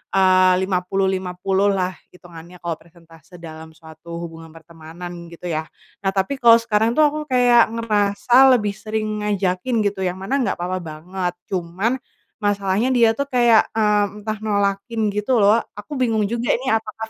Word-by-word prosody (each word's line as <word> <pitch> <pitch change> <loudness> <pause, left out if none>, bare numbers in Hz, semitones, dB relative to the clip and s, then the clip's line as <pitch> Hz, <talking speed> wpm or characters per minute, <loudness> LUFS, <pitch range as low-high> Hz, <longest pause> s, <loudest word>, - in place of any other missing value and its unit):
eee, 185 -1 +5
50-50 190 +1 -1
lah 185 -2 0 0.2
hitungannya 175 0 -14
kalo 165 -2 -3
persentase 165 0 -19
dalam 160 -1 -10
suatu 160 +1 -12
hubungan 165 -1 -10
pertemanan 170 +2 -10
gitu 170 +1 -8
ya. 155 0 -2 0.4
Nah 195 - +2
tapi 195 +9 -1
kalo 230 -1 +7
sekarang 225 0 +1
tuh 310 - +3
aku 305 - -4
kayak 245 -2 +5
ngerasa 230 +4 +4
lebih 210 -3 -1
sering 215 -1 -3
ngajakin 205 +3 0
gitu, 200 -1 -2
yang 180 0 -2
mana 270 +9 -1
nggak 230 -7 0
apa-apa 180 +1 -3
banget, 175 +3 -5 0.2
cuman, 190 +8 -2 0.4
masalahnya 205 +2 0
dia 230 -2 +5
tuh 280 +5 -3
kayak, 240 -4 +4
eee, 210 -1 +3 0.2
entah 215 0 -3
nolakin 205 +1 -1
gitu 210 +3 0
loh. 215 +3 +5 0.2
Aku 230 +7 -7
bingung 225 -4 +1
juga 235 +1 0
ini 260 +1 -2
apakah 220 0 -3
200 Hz, 155 wpm, -21 LUFS, 180-225 Hz, 0.4 s, kalo